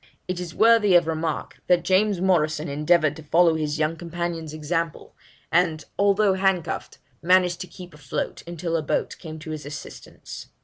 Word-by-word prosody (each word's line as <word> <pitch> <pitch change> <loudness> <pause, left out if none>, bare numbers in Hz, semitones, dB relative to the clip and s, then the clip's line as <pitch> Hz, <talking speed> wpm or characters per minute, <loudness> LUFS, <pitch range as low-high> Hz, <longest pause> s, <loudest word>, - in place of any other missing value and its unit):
It 185 -1 -3
is 175 -2 -6
worthy 225 -4 +5
of 175 -1 +6
remark, 160 -1 -3
that 180 -1 +3
James 195 0 +2
Morrison 160 -4 +1
endeavoured 150 +2 +2
to - - -9
follow 165 +3 +4
his 155 -1 -2
young 155 +1 0
companion's 170 -1 -4
example, 165 +2 -3 0.4
and, 165 -2 +1
although 200 0 +4
handcuffed, 190 -3 -1 0.2
managed 180 0 +3
to 185 - -6
keep 180 -2 -12
afloat 150 -3 -4
until 170 0 -3
a 165 - +1
boat 150 - -2
came 160 -2 -8
to 160 0 -8
his 155 -1 -5
assistance.' 150 +2 -9
170 Hz, 165 wpm, -24 LUFS, 155-180 Hz, 0.4 s, of